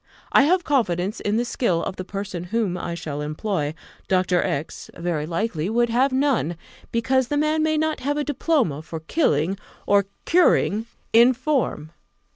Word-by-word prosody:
I 280 - +6
have 360 +3 +3
confidence 205 - 0
in 205 +1 0
the 240 - +1
skill 185 -8 0
of 190 - -4
the 185 - -5
person 195 -2 -5
whom 210 -1 -1
I 175 -1 -4
shall 150 -3 -5
employ: 155 0 -2 0.3
Dr. 185 -1 +2
X, 140 +3 -4
very 170 -3 -2
likely, 170 -1 -2
would 240 +1 +2
have 260 +4 +3
none, 260 - +1 0.4
because 255 +2 +1
the 290 - -1
man 305 +1 +1
may 310 0 +1
not 315 0 0
have 290 +2 -1
a 295 - 0
diploma 275 - 0
for 160 0 -7
killing 180 - +1 0.3
or 200 -1 +3 0.2
curing 235 - +3 0.3
in 235 +3 +7
form. 255 - -1
215 Hz, 165 wpm, -23 LUFS, 175-270 Hz, 0.4 s, in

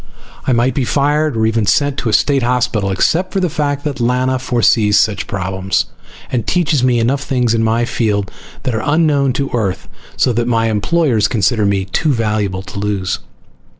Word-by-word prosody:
I - - +3
might 120 +1 +2
be 135 - -1
fired, 145 +1 +1
or 110 - +2
even 110 -1 0
sent 145 -1 +2
to 120 - -2
a - - -1
state 140 +3 +3
hospital, 120 -4 0
except 165 - +1
for 195 - 0
the 180 -4 0
fact 145 -3 -2
that 145 -4 -3
Lana 130 +2 +1
foresees 115 -4 +2
such 105 -3 +1
problems 95 0 -1 0.5
and 120 -5 -2
teaches 155 -6 +1
me 125 -2 +3
enough 130 +5 +1
things 125 -5 0
in 115 - +1
my 115 +2 +1
field 105 -5 -1 0.3
that 130 -3 -1
are 110 - -1
unknown 145 -3 +2
to 140 +2 -2
Earth, 105 -6 -2 0.3
so 125 - +2
that 120 +1 -1
my 115 -2 +1
employers 120 +1 +1
consider 105 -1 +1
me 100 -1 0
too 150 - 0
valuable 105 -5 -1
to 100 - -8
lose. 100 -2 -2
120 Hz, 185 wpm, -16 LUFS, 105-140 Hz, 0.5 s, I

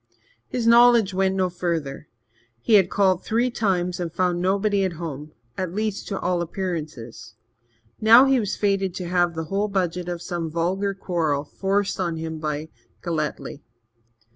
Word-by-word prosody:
His 240 -2 -3
knowledge 235 -3 +6
went 190 0 +1
no 190 -1 +1
further. 165 -5 -3 0.5
He 220 - 0
had 190 -4 +6
called 190 -3 +2
three 240 +3 0
times 180 -6 -1
and 170 -2 -3
found 175 0 0
nobody 200 +2 +1
at 185 -2 -1
home 155 -3 -7 0.3
at 185 -1 -3
least, 215 -1 -2
to 195 - -3
all 180 -1 0
appearances. 160 - -6 0.6
Now 230 +4 +7
he 270 -1 +3
was 210 -3 -2
fated 195 -3 0
to 180 - -5
have 175 -1 +1
the 160 - -3
whole 205 +2 +1
budget 180 -3 -2
of 175 -1 -5
some 170 -3 -3
vulgar 185 +5 -1
quarrel 160 -7 -1
forced 195 +6 -1
on 170 -3 -1
him 160 0 -5
by 155 0 -4 0.3
Galletly. 155 -4 -3
180 Hz, 160 wpm, -23 LUFS, 165-200 Hz, 0.6 s, Now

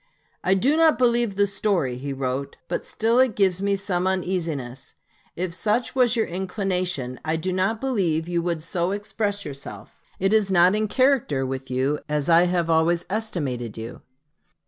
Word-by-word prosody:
"I 190 - +3
do 260 +10 +2
not 320 -1 +4
believe 235 -4 +2
the 200 +1 +3
story," 195 -10 0
he 140 +3 -5
wrote, 135 +1 -3
"but - - -2
still 230 +3 +1
it 260 -5 +3
gives 190 -2 +2
me 200 0 +1
some 185 -2 -1
uneasiness. 170 -9 -3 0.4
If 175 0 -3
such 215 +6 0
was 250 -2 +3
your 225 - +2
inclination, 180 - -2
I 160 +1 0
do 180 +3 -2
not 190 +4 0
believe 185 -12 0
you 175 -1 0
would 170 -2 -2
so 175 +2 -1
express 205 0 -2
yourself. 135 -7 -9 0.2
It 195 +2 +2
is 210 -3 +3
not 180 0 +5
in 215 +1 +1
character 255 - +2
with 130 0 -5
you 130 +3 0
as 150 0 -1
I 170 +1 +6
have 175 -2 0
always 165 +1 +2
estimated 145 - -3
you." 115 +2 -7
180 Hz, 170 wpm, -24 LUFS, 150-205 Hz, 0.4 s, I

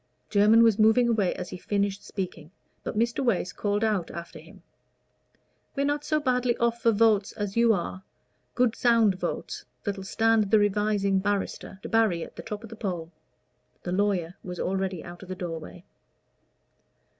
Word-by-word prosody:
Jermyn 215 +2 +6
was 225 -2 +4
moving 220 +3 +5
away 215 -6 +1
as 180 - -6
he 180 - -7
finished 200 0 -1
speaking, 175 -6 -6 0.3
but - - -5
Mr. 235 +4 +1
Wace 205 -7 0
called 205 +1 -1
out 210 -6 0
after 170 0 -8
him, - - -16 1.1
"We're 280 0 0
not 290 +1 0
so 305 0 +1
badly 250 -3 +1
off 235 0 0
for 230 - +4
votes 215 -2 +3
as 205 -2 -4
you 230 0 +5
are 185 -1 -2 0.5
good 250 -2 +2
sound 230 -4 +4
votes, 185 - -4 0.2
that'll 200 -2 -3
stand 225 +1 +2
the 220 - +5
Revising 205 -1 +2
Barrister. 200 -1 -2
Debarry 220 -7 +2
at - - -15
the - - -7
top 210 -1 -6
of 225 - -10
the - - -7
poll!" 175 -6 -4 0.7
The 175 - -4
lawyer 185 -3 0
was 180 -1 -7
already 190 -2 -2
out 175 0 -10
of 190 - -11
the 185 - -4
doorway. 170 -1 -7
205 Hz, 165 wpm, -27 LUFS, 185-225 Hz, 1.1 s, Jermyn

